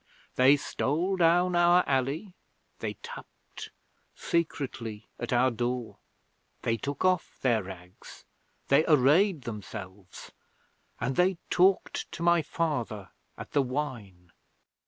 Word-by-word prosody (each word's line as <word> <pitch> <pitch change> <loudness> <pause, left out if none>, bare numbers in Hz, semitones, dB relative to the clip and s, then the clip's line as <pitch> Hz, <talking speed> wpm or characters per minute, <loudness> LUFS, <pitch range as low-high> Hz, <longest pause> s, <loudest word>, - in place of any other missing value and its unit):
They 135 +3 +6
stole 165 +7 -1
down 175 +1 +3
our 175 +1 +5
alley, 140 +8 -1 0.5
they - - -4
tapped - - -10 0.5
secretly 130 -9 -3
at - - -4
our 125 +1 +3
door, 120 0 -3 0.6
they 115 - +1
took 140 - -3
off 185 -2 +1
their 120 -4 +3
rags, 90 -1 -12 0.4
they 140 +3 +5
arrayed 155 +3 +4
themselves, 100 -4 -9 0.7
and 135 - -2
they 180 0 +3
talked 185 +2 +2
to 170 - -5
my 170 -1 +4
father 125 - -3 0.3
at - - -9
the 145 - +3
wine. 120 -10 -5
140 Hz, 115 wpm, -28 LUFS, 115-170 Hz, 0.7 s, They